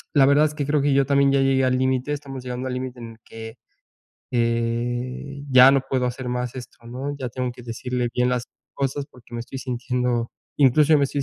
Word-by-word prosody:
la 140 -2 +7
verdad, 145 +2 +5
es 150 - -1
que 145 - -2
creo 145 -1 +2
que 140 -1 +2
yo 135 0 +4
también 140 -1 +4
ya 140 -1 +3
llegué 135 -1 +3
al 130 0 +2
límite, 130 +2 0
estamos 135 -3 -6
llegando 125 +1 -4
al 125 - -3
límite 125 -1 -5
en 115 - -8
el 110 - -19
que, 115 +1 -9 0.8
eh, 120 +3 -1
ya 130 0 +9
no 140 - +3
puedo 130 -2 +1
hacer 125 +1 -4
más 125 0 -2
esto, 120 -1 -10
¿no?, 135 +4 -4
ya 130 - -3
tengo 125 0 -2
que 125 - -13
decirle 125 +1 -2
bien 125 0 +2
las 125 -1 -1 0.3
cosas 140 +1 -2
porque 120 -1 -15
me 120 - -3
estoy 125 +3 -7
sintiendo, 125 -2 -1 0.3
incluso 145 +3 +5
yo 150 - +6
me 140 - +3
estoy 140 +1 -2
130 Hz, 225 wpm, -23 LUFS, 125-140 Hz, 0.8 s, ya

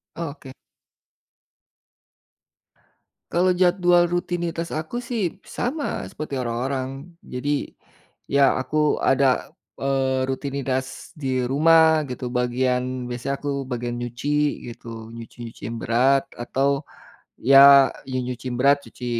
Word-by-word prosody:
Oke. 150 -5 -7 2.8
Kalau 180 +2 +3
jadwal 175 -1 +3
rutinitas 175 -1 -2
aku 160 +9 -7
sih 235 -2 -3 0.2
sama 285 +5 -3 0.2
seperti 145 -3 -5
orang-orang. 130 +5 -3 0.2
Jadi, 145 +3 -2 0.6
ya 140 - +4 0.2
aku 130 +4 -3 0.3
ada, 135 +1 +3 0.6
eee, 135 -1 +1
rutinitas 135 -1 -3
di 135 - -2 0.2
rumah 160 0 +5
gitu 125 0 -5
bagian 125 +1 +1 0.3
biasanya 120 +3 -3
aku 145 - -4 0.2
bagian 120 0 -3
nyuci 120 +4 -4 0.4
gitu, 120 0 -14 0.3
nyuci-nyuci 115 0 -10
yang 115 - -5
berat 130 +3 +3 0.2
atau, 135 +3 +1 0.8
ya 140 0 +9 0.2
nyuci-nyuci 125 -2 -4
yang 120 - -4
berat 140 +2 +5
cuci 125 - -10
135 Hz, 105 wpm, -23 LUFS, 125-160 Hz, 2.8 s, ya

